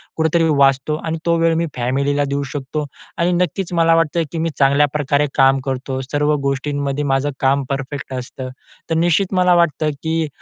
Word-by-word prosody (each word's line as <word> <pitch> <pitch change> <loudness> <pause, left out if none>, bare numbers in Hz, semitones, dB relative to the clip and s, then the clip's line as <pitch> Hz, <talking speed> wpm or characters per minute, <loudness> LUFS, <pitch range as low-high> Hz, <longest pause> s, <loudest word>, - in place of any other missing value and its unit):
कुठेतरी 160 +1 +2
वाचतो 135 +2 +3
आणि 165 0 -2
तो 170 0 +3
वेळ 165 0 +3
मी 165 +1 0
फॅमिलीला 140 +4 0
देऊ 140 0 -1
शकतो 145 +1 -4 0.3
आणि 175 0 +1
नक्कीच 180 +1 -1
मला 165 -1 +4
वाटतं 165 0 +1
की 170 - -5
मी 165 +1 0
चांगल्याप्रकारे 145 +1 +2
काम 135 0 +5
करतो. 130 0 -3
सर्व 145 +3 0
गोष्टींमध्ये 140 +1 -1
माझं 135 0 +1
काम 135 +1 +2
परफेक्ट 140 0 -4
असतं. 130 0 -6 0.4
तर 165 - 0
निश्चित 175 +4 +2
मला 180 -1 +4
वाटतं 155 -3 +2
की 160 0 0
145 Hz, 165 wpm, -19 LUFS, 135-165 Hz, 0.4 s, काम